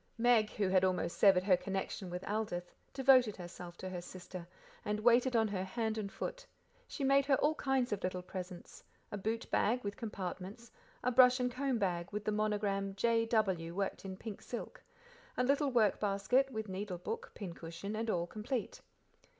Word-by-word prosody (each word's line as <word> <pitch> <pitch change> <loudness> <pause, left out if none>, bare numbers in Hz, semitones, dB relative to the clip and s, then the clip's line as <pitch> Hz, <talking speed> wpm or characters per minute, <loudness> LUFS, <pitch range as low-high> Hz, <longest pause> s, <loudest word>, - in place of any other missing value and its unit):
Meg, 230 -2 +4
who 205 -2 0
had 185 0 +3
almost 180 -2 +1
severed 190 -3 +6
her 190 -1 +5
connection 190 0 -4
with 180 +1 -5
Aldith, 200 -4 -2 0.2
devoted 255 -5 +5
herself 175 -1 -9
to 185 - -6
her 180 -1 -5
sister, 180 0 -9 0.4
and 210 0 -2
waited 240 +2 +4
on 220 -1 +4
her 190 -2 -2
hand 220 +3 -2
and 200 -2 -4
foot; - - -5 0.4
she 285 - -5
made 275 0 +4
her 275 - +5
all 295 +3 +2
kinds 265 -5 0
of 200 - -3
little 185 0 -2
presents 180 -1 -8 0.3
a 205 - -3
boot 225 +4 -2
bag, 245 +4 +2
with 200 0 -4
compartments; 200 +1 -6 0.3
a 250 - +2
brush 255 +1 +7
and 250 0 0
comb 260 0 0
bag, 175 -5 -1
with 210 0 -4
the 215 - +1
monogram 205 -2 0
"J.W.," 215 -6 +1
worked 195 0 -2
in 190 -1 -6
pink 215 -1 -7
silk; 240 - -7 0.6
a - - +2
little 280 +2 +2
work 225 -6 +3
basket, 210 +7 +2
with 220 -4 -4
needle 190 -1 -4
book, 460 - -5
pin 190 -5 -6
cushion, 170 +6 -6
and 225 +1 -2
all 175 -4 +1
complete. 220 +6 -4
210 Hz, 180 wpm, -34 LUFS, 185-240 Hz, 0.6 s, brush